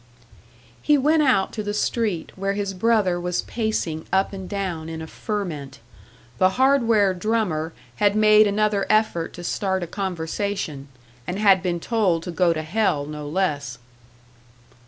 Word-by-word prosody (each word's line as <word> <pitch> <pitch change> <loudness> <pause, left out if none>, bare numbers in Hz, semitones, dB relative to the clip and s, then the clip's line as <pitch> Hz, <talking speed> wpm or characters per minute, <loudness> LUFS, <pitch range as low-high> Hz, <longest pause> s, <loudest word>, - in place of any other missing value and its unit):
He 295 -1 +4
went 305 +3 +3
out 255 -9 +2
to 215 - -3
the 205 0 -3
street, 210 -7 -1
where 195 +1 -1
his 200 -1 -3
brother 190 -3 +1
was 180 0 -1
pacing 215 -9 -2
up 190 +1 +1
and 190 -2 -7
down 185 -6 -3
in 160 0 -6
a 160 - -6
ferment. 170 - -5 0.6
The 185 - +5
"hardware 230 -7 +4
drummer" 180 -5 -1 0.3
had 205 -1 +3
made 215 0 +6
another 205 -1 +1
effort 215 -6 +1
to 175 - -9
start 190 0 -1
a - - -2
conversation, 180 -4 -3 0.4
and 180 - -3
had 200 -3 +5
been 175 -2 -1
told 185 -5 0
to 175 - -5
go 175 0 +2
to 155 -1 -2
hell 160 -4 0
no 150 0 -7
less! 145 -8 -1
195 Hz, 155 wpm, -23 LUFS, 170-215 Hz, 0.6 s, made